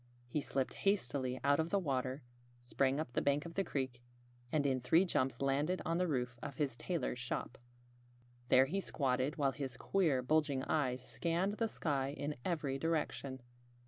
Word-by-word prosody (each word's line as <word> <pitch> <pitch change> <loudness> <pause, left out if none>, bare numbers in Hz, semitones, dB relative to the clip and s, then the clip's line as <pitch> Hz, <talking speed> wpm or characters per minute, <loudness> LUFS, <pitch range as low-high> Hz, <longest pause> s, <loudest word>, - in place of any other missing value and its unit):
He 145 +5 -1
slipped 135 -1 -1
hastily 130 -10 +1
out 140 +1 +4
of 160 +1 +1
the 200 - +2
water, 135 -5 -1 0.4
sprang 130 +3 +1
up 140 -6 -4
the - - +1
bank 145 +2 +2
of 170 - -7
the 195 - +1
creek, 130 -7 -3 0.5
and 150 -2 +2
in 130 -2 +2
three 160 +9 +4
jumps 130 -6 0
landed 145 +7 +1
on 165 +2 +1
the 180 - +2
roof 125 -5 -1
of 140 -2 -5
his 135 -3 -1
tailor's 160 -3 -2
shop. 125 0 -3 0.9
There 130 +1 +7
he 180 +9 -1
squatted, 135 -4 0
while 140 -3 +2
his 135 -3 -5
queer, 160 -10 +2
bulging 145 -1 +2
eyes 130 -5 0
scanned 170 - 0
the 225 - +1
sky 140 -8 -1
in 145 +1 -2
every 145 -6 -1
direction. 145 -4 -1
140 Hz, 175 wpm, -36 LUFS, 130-160 Hz, 0.9 s, There